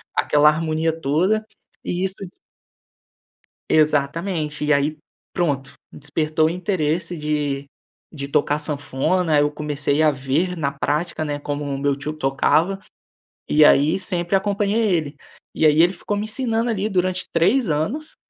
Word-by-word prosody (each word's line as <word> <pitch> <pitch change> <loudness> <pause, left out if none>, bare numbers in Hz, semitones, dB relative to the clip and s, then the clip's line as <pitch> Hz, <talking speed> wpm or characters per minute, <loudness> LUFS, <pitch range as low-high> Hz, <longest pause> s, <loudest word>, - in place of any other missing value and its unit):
aquela 150 0 +3
harmonia 160 +1 -1
toda. 180 +9 +1 0.4
E 180 +2 -2
isso 190 0 -2 1.5
Exatamente. 155 +1 +1
E 150 - +3
aí 145 +2 0 0.4
pronto, 140 -7 -1 0.2
despertou 155 +2 0
o - - +1
interesse 170 -1 -1
de 150 -2 -2 0.5
de 140 -3 -6
tocar 145 +1 +1
sanfona, 150 +3 0
eu 145 0 +2
comecei 150 0 -1
a 155 - +5
ver 145 +6 -1
na 140 -3 -1
prática, 150 +4 -2
né, 145 -1 -3
como 145 0 -4
o 140 -1 -3
meu 140 0 0
tio 140 +2 -5
tocava. 155 +6 +1 0.7
E 150 0 +6
aí, 150 +6 +4
sempre 175 -1 -2
acompanhei 205 +2 +1
ele. 150 -3 -3 0.4
E - - +1
aí, 155 +1 +5
ele 175 +2 +4
ficou 200 +2 -4
me 205 - -2
ensinando 230 +1 0
ali, 210 -2 -1
durante 185 -2 0
3 195 +7 +2
anos 220 - -2
155 Hz, 140 wpm, -21 LUFS, 145-185 Hz, 1.5 s, E